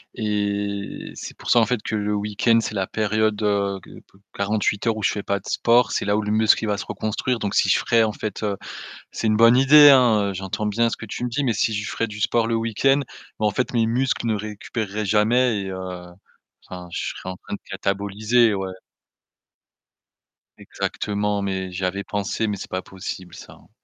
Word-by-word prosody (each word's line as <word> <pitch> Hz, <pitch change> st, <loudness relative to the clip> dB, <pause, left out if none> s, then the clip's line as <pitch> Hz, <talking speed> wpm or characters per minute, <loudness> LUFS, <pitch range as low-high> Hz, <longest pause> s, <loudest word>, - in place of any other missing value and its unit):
et 100 Hz, -2 st, -2 dB
c'est -, -, -8 dB
pour -, -, -8 dB
ça 120 Hz, -, +6 dB
en 115 Hz, -, +4 dB
fait 125 Hz, -3 st, -1 dB
que -, -, -3 dB
le 105 Hz, 0 st, -1 dB
week-end, 105 Hz, +3 st, +2 dB
c'est 110 Hz, -, -4 dB
la 95 Hz, -1 st, -1 dB
période, 110 Hz, 0 st, 0 dB
heu, 100 Hz, -1 st, +1 dB
ge -, -, -13 dB
pe 95 Hz, -, -24 dB
48 105 Hz, +1 st, -1 dB
heures 115 Hz, -, +2 dB
où 110 Hz, -, -6 dB
je -, -, +3 dB
fais 105 Hz, -, -4 dB
pas 100 Hz, 0 st, -1 dB
de -, -, -14 dB
sport. 120 Hz, +1 st, +3 dB
C'est -, -, -1 dB
là 100 Hz, -, +2 dB
où 110 Hz, -, +1 dB
le 105 Hz, -, -3 dB
muscle, 110 Hz, +1 st, +3 dB
il -, -, -1 dB
va 105 Hz, -1 st, 0 dB
se -, -, -5 dB
reconstruire, 115 Hz, +3 st, -2 dB
donc 100 Hz, -2 st, -2 dB
si -, -, +3 dB
je -, -, +4 dB
ferais 115 Hz, -1 st, +3 dB
en 110 Hz, -1 st, 0 dB
fait, 105 Hz, -2 st, -5 dB
heu, 105 Hz, -2 st, 0 dB, 0.6 s
c'est 110 Hz, -, -1 dB
une 110 Hz, -, +3 dB
bonne 115 Hz, +1 st, +7 dB
idée, 145 Hz, +3 st, +8 dB
hein, 120 Hz, -7 st, +5 dB
heu, 100 Hz, -, -4 dB
j'entends 95 Hz, +3 st, -3 dB
bien 115 Hz, +3 st, +1 dB
ce -, -, -5 dB
que 110 Hz, -, -8 dB
tu 115 Hz, -, -5 dB
me 125 Hz, -, -2 dB
dis, 135 Hz, +5 st, -1 dB
mais 125 Hz, -5 st, +1 dB
si 110 Hz, +2 st, +1 dB
je 105 Hz, -1 st, -3 dB
ferais 115 Hz, -, -1 dB
du 105 Hz, 0 st, -8 dB
sport 115 Hz, +2 st, +2 dB
le 115 Hz, -, -1 dB
week-end, 115 Hz, +5 st, +2 dB, 0.4 s
mais 105 Hz, -, +2 dB
en 105 Hz, -, +3 dB
fait, 125 Hz, +5 st, -2 dB
mes 115 Hz, -2 st, +2 dB
muscles 125 Hz, +1 st, 0 dB
ne 110 Hz, -, +1 dB
récupéreraient 105 Hz, 0 st, -4 dB
jamais 110 Hz, +2 st, +2 dB
et 95 Hz, -, -5 dB
heu, -, -, -5 dB, 1.0 s
enfin, 90 Hz, -1 st, -8 dB
je -, -, -2 dB
serais -, -, -9 dB
en 95 Hz, -, -5 dB
train 95 Hz, -, -7 dB
de -, -, -11 dB
cataboliser, 100 Hz, +4 st, +1 dB
ouais. 95 Hz, -1 st, -3 dB, 1.9 s
Exactement, 105 Hz, 0 st, -2 dB
mais 95 Hz, -1 st, -3 dB
j'y 90 Hz, +1 st, -3 dB
avais 100 Hz, +2 st, -2 dB
pensé, 100 Hz, +2 st, -2 dB
mais 105 Hz, -1 st, -2 dB
c'est -, -, -8 dB
pas 95 Hz, 0 st, -3 dB
possible 95 Hz, -1 st, -8 dB
ça, -, -, -12 dB
hein. -, -, -21 dB
105 Hz, 225 wpm, -23 LUFS, 100-115 Hz, 1.9 s, idée